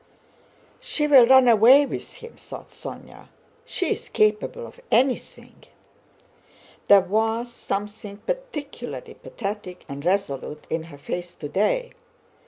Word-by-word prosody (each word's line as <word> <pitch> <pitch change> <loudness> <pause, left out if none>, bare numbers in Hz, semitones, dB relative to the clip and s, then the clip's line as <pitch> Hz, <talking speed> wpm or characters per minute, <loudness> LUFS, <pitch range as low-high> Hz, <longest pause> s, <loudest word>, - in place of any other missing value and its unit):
"She 300 - -2
will 270 -5 +7
run 260 0 +7
away 240 +5 +7
with - - -7
him!" 470 0 -12
thought - - -11
Sónya. - - -10 0.4
"She 360 - -2
is - - -4
capable 215 - +1
of - - -13
anything. 255 +1 -1 1.2
There 200 -1 +8
was 225 +5 -1
something 205 -1 -5
particularly - - -6
pathetic 200 - -7
and 140 -1 -7
resolute 155 -5 -2
in 160 0 -2
her 165 -4 -12
face 175 +5 -6
today. 210 - -1
220 Hz, 115 wpm, -24 LUFS, 190-280 Hz, 1.2 s, There